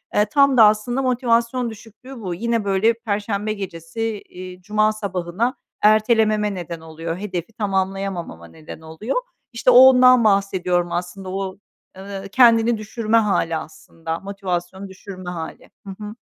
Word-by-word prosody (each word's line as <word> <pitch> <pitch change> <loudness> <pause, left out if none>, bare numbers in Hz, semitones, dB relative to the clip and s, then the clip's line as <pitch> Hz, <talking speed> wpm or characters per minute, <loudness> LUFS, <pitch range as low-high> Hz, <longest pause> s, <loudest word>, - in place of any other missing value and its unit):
Eee, 210 - +4
tam 275 +3 +3
da 225 - +8
aslında 215 +5 +1
motivasyon 245 -1 +1
düşüklüğü 230 +4 -12
bu. 185 -4 -4
Yine, 230 +3 -1
böyle, 200 +4 +2
perşembe 210 -2 -3
gecesi, 180 -1 -7 0.3
eee, 185 0 -10
cuma 215 +3 +1
sabahına 200 +3 -2 0.3
ertelememe 215 -1 +3
neden 175 -2 -6
oluyor, 165 +1 -6
hedefi 185 0 -5
tamamlayamama 195 - -3
neden 155 - -12
oluyor. 160 +10 -5 0.4
İşte, 235 +2 +1
o - - +4
ondan 255 -1 +7
bahsediyorum 185 -4 +1
aslında 180 +2 -5
o, 190 0 -4 0.4
eee, 195 0 -7
kendini 230 -1 +5
düşürme 220 +1 -1
hâli, 195 -7 +1
aslında 160 +1 -7
motivasyonu 190 -1 -5
düşürme 185 -1 -9
hâli. 165 -2 -7 0.2
Hı - - -6
hı. 210 +1 -7
200 Hz, 135 wpm, -21 LUFS, 180-225 Hz, 0.4 s, da